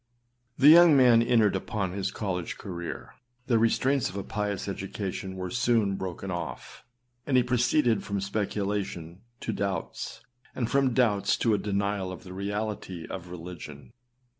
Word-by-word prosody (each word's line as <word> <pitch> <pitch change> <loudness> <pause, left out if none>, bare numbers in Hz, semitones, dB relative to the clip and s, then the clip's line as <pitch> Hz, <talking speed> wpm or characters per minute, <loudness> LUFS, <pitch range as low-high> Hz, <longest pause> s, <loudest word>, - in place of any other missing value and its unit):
The 140 +3 +7
young 165 -2 +8
man 120 -3 +6
entered 115 -4 +3
upon 95 -1 -2
his 95 0 -2
college 90 -5 -3
career. 95 +5 -7 0.3
The 115 -3 +3
restraints 130 +4 +2
of 90 - -10
a 100 - -3
pious 105 -2 -3
education 95 -1 -4
were 90 -1 -5
son 115 -5 +2
broken 95 0 -5
off, 85 -1 -6 0.4
and 135 -3 +3
he 125 - +5
proceeded 120 -1 +2
from 100 0 -2
speculation 100 -3 -3 0.2
to - - -2
doubts, 100 -1 -4 0.3
and 120 -3 -2
from 135 -3 +2
doubts 110 -6 +2
to 115 - +2
a 105 - +2
denial 100 -2 -1
of 95 - -9
the 90 -2 -10
reality 100 -3 -4
of 90 -2 -7
religion. 85 -1 -9
100 Hz, 150 wpm, -28 LUFS, 95-115 Hz, 0.4 s, young